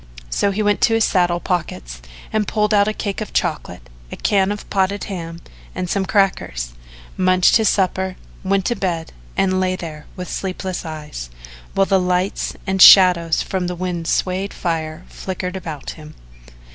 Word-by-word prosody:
So 200 - +1
he 205 +2 -1
went 205 -1 +1
to 225 - +4
his 225 - +3
saddle 175 -3 +2
pockets 60 - -3 0.3
and 215 -1 +1
pulled 210 0 +1
out 205 0 +4
a - - +2
cake 205 -1 -4
of 215 - -6
chocolate, - - -2 0.2
a - - -5
can 195 -1 +2
of 205 - -6
potted 195 +1 +1
ham 170 -3 -6 0.3
and 180 - -2
some 190 +1 -1
crackers, 170 - 0 0.4
munched 185 +1 +4
his 220 -3 +3
supper, 190 -1 0 0.3
went 195 0 +1
to 240 - +1
bed, 170 -5 -3 0.2
and 185 -1 +2
lay 185 0 +1
there 155 -4 -8
with 180 0 -6
sleepless 185 -1 -4
eyes, 150 - -7 0.5
while 195 - +4
the 195 -1 +3
lights 180 +1 -1
and 190 -1 0
shadows 180 -5 +8
from 185 -2 -2
the 180 - -3
wind 175 -2 -3
swayed 190 +4 -1
fire 160 -1 -3
flicked 185 0 -5
about 160 -6 -6
him. 155 -1 -12
185 Hz, 170 wpm, -20 LUFS, 170-195 Hz, 0.5 s, shadows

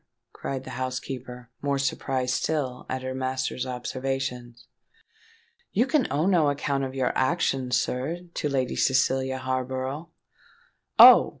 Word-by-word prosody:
cried 135 -1 -5
the - - -8
housekeeper, 130 -1 -5
more 140 -1 0
surprised 130 -1 -1
still 135 -5 -2
at 130 0 -3
her 130 0 -3
master's 130 0 -2
observations. 125 -1 -4 1.1
"You 230 +6 +3
can 270 -2 +1
owe 150 +4 +1
no 175 -6 +3
account 140 -1 -1
of 130 0 -4
your 130 -2 0
actions, 130 -4 +1
sir, 145 +10 -3
to 150 - -2
Lady 130 -2 -1
Cecilia 130 0 +1
Harborough." 130 +4 -3 0.9
"Oh! - - +10
130 Hz, 125 wpm, -26 LUFS, 130-140 Hz, 1.1 s, Oh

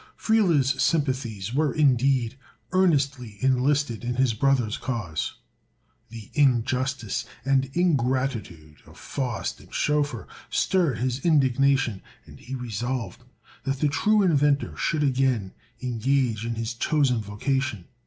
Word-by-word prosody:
Friele's 165 - +2
sympathies 130 - 0
were 150 +2 +2
indeed 130 -4 +2 0.4
earnestly 140 - +1
enlisted 130 -1 +1
in 120 +1 -2
his 130 -2 +2
brother's 120 -2 +1
cause. 100 -12 -3 0.7
The 110 -2 -10
injustice 130 -4 +1 0.2
and 135 -1 +2
ingratitude 130 - -1
of - - -16
Faust 125 -7 -4
and - - -17
Schoeffer 145 -8 0 0.2
stirred 170 - +1
his 125 +2 -2
indignation, 135 - +2 0.2
and - - -14
he 130 +3 -7
resolved 125 +1 -4 0.4
that 135 0 -1
the 150 +2 +1
true 210 +8 +3
inventor 145 -5 +2
should 155 -3 0
again 130 -7 +1 0.3
engage 120 -2 0
in 115 - -2
his 115 +1 -3
chosen 125 -1 +1
vocation. 110 0 -2
130 Hz, 115 wpm, -25 LUFS, 115-140 Hz, 0.7 s, true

